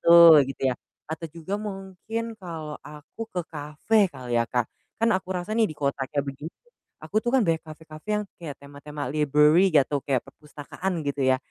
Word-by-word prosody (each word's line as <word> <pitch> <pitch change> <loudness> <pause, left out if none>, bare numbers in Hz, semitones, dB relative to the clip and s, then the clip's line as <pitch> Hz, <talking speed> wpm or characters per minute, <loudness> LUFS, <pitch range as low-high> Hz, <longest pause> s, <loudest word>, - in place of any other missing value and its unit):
tuh 170 -2 +9
gitu 135 - -7
ya, - - -5 0.3
atau 160 +1 -4
juga 165 +4 -5
mungkin 210 +3 -5
kalau 160 -4 -6
aku 150 +7 -13
ke 180 - -3
kafe 155 +8 +1
kali 125 -6 -2
ya - - +2
Kak, 120 -2 +1 0.3
kan 230 +1 +2
aku 185 -1 -1
rasa 180 +4 -4
nih 225 -1 +3
di 155 - -9
kota 140 -1 -1
kayak 145 -1 -1
begini, 140 +3 -6 0.6
aku 215 - 0
tuh 240 - -3
kan 255 - +4
banyak 165 -2 +1
kafe-kafe 155 +2 -12
yang 210 - -2 0.2
kayak 150 -5 -6
tema-tema 145 +1 -8
library 150 +4 +5
nggak 150 -6 +5
tuh, 145 - +1
kayak 130 -2 -1
perpustakaan 150 +5 -6
gitu 140 0 -2
ya. 130 - +5
155 Hz, 190 wpm, -26 LUFS, 145-185 Hz, 0.6 s, tuh